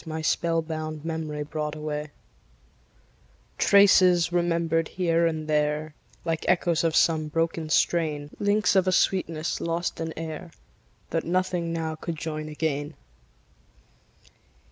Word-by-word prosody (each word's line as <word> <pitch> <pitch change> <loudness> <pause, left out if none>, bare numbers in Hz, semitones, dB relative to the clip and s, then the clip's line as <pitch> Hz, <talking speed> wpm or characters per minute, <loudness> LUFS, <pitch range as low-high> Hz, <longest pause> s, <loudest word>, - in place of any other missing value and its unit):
My 160 -1 -5
spell 165 +1 +1
bound 155 -1 -5
memory 155 -2 -3
brought 150 0 -4
away; 150 0 -4 1.5
Traces, 185 -4 +5
remembered 165 -2 +1
here 170 -2 +1
and 155 -1 -3
there, 150 0 0 0.3
Like 165 -1 -1
echoes 170 -2 +2
of 165 -1 +1
some 160 -2 +3
broken 165 0 -1
strain; 155 -3 +1
Links 205 0 +2
of 190 -1 +3
a - - +4
sweetness 165 -4 0
lost 170 +1 -2
in 165 0 -3
air, 160 +1 -6 0.6
That 165 - 0
nothing 180 -1 -1
now 160 -1 -2
could 165 +1 -5
join 155 -1 -5
again. 150 -1 -2
160 Hz, 120 wpm, -26 LUFS, 155-170 Hz, 1.5 s, Traces